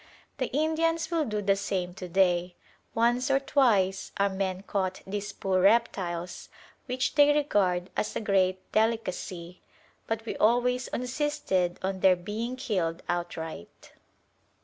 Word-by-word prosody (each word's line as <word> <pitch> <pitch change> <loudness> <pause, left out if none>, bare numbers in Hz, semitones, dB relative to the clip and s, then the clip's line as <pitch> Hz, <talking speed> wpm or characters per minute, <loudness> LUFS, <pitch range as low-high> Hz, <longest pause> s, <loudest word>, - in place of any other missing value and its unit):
The 255 - 0
Indians 320 +3 0
will 330 -2 +1
do 210 -3 -2
the 195 0 +3
same 190 -2 -2
to 185 0 -7
day: 180 -1 +2 0.4
once 240 +4 +2
or 270 0 +4
twice 205 -9 +2
our 200 0 +3
men 190 -1 -3
caught 190 -2 -2
these 205 +1 -4
poor 190 -2 0
reptiles, 185 -5 +1 0.4
which 255 0 -1
they 290 -1 +6
regard 195 -11 +1
as - - -2
a - - 0
great 190 -3 +1
delicacy; 185 -5 -1 0.5
but 225 0 -2
we - - -4
always 245 +3 +2
insisted 245 - -1
on 190 0 -2
their 185 -1 +5
being 215 +7 -4
killed 185 -10 -2
outright. 170 - -5
200 Hz, 135 wpm, -28 LUFS, 185-245 Hz, 0.5 s, they